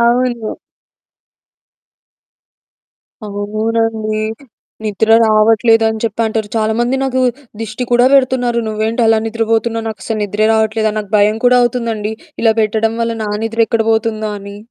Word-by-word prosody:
అవును. 235 -1 0 2.7
అవునండి. 215 +1 -2 0.6
నిద్ర 215 +1 -1 0.2
రావట్లేదని 220 +1 +3
చెప్పంటారు. 220 -1 -1
చాలామంది 230 +4 0
నాకు 260 -1 0 0.4
దిష్టి 225 +2 -4
కూడా 245 +1 +5
పెడుతున్నారు. 255 -3 +2
నువ్వేంటలా 225 +1 +1
నిద్రపోతున్నావు? 225 0 -1
నాకస్సలు 215 +1 -4
నిద్రే 205 +1 0
రావట్లేదని. 220 0 0
నాకు 205 -2 -6
భయం 210 +1 +3
కూడా 250 0 +5
అవుతుందండి. 230 -3 -1 0.3
ఇలా 225 -1 +5
పెట్టడం 220 +1 0
వల్ల 230 0 -1
నా - - -3 0.2
నిద్ర 225 0 0
ఎక్కడ 225 -1 0
పోతుందో 220 -1 -1
అని. 200 0 -10
225 Hz, 110 wpm, -15 LUFS, 215-230 Hz, 2.7 s, కూడా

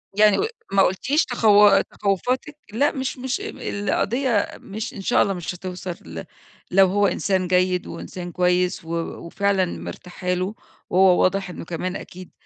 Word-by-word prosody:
يعني 210 -1 +5
و - - +2 0.3
ما 195 0 +4
قولتيش 265 - +2
تخو 210 -4 +5
تخوّفاتِك؟ 250 - -2 0.2
لأ، 280 +6 +2
مش 265 -1 -3
مش 260 +10 -3
القضية 225 - -1
مش 215 +2 -6
إن 195 - -7
شاء - - +3
الله 195 - +2
مش 180 0 -5
هتوصل 180 0 -6
ل 80 0 -7 0.5
لو 190 +1 +6
هو 200 +2 +2
إنسان 190 -2 0
جيد، 180 0 +1
وإنسان 175 +1 -7
كويس 180 0 +1
و - - -11 0.4
وفعلًا 195 +1 +1
مرتاحة 180 +1 -5
له، 185 +4 -2 0.3
وهو 185 -1 +5
واضح 195 0 +1
إنه 175 - -8
كمان 180 +3 -4
أكيد 185 0 -9
190 Hz, 155 wpm, -23 LUFS, 180-210 Hz, 0.5 s, لو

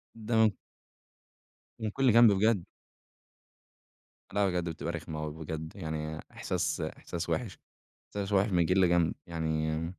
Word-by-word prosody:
ده 110 -2 +2 1.2
من 110 -1 -1
كل 135 +3 +3
جنب 115 -2 +8
بجد. 100 -1 +3 1.7
لأ، 100 -1 +3
بجد 90 -2 -1
بتبقى 80 +1 -4
رخمة 80 -2 -5
اوي 75 -1 -4
بجد، 80 0 -6
يعني 80 0 -4
إحساس - - -2
إحساس 85 +1 -5
وحِش. 115 -7 -2 0.5
إحساس 100 0 -4
وحِش 100 +2 +4
من 85 -2 +3
كل 90 +1 +4
جنب 85 -1 +3
يعني 80 -1 -1
85 Hz, 125 wpm, -30 LUFS, 80-105 Hz, 1.7 s, جنب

